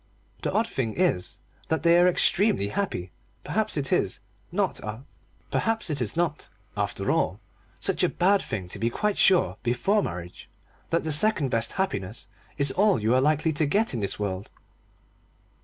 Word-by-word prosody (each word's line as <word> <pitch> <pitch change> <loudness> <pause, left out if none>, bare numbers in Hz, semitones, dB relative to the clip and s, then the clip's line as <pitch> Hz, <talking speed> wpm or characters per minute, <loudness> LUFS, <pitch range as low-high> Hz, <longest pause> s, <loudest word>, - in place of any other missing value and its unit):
The - - -1
odd 220 +2 +2
thing 120 - -3
is 170 - +1 0.3
that 160 - -1
they 170 0 +6
are 175 - +6
extremely 180 - +3
happy. 100 - -3 0.3
Perhaps - - -1
it - - 0
is - - 0 0.3
not, - - 0 0.8
after 160 - -2
all, - - 0 0.4
such - - +1
a - - +4
bad 195 +3 +3
thing 95 -5 -5
to 100 - -7
be 115 +2 +1
quite 210 - -1
sure, 185 -2 +4
before 125 - +1
marriage, 90 - -7 0.4
that 165 - +1
the 160 - -2
second 150 -3 +2
best 115 0 0
happiness 110 - -3 0.3
is 140 -2 +3
all 200 - +3
you 110 +3 +1
are 130 - +4
likely 155 +3 +2
to 150 0 +1
get 210 +6 +1
in 120 - -2
this 100 -2 -1
world. 100 -1 -4
150 Hz, 155 wpm, -26 LUFS, -, 0.8 s, they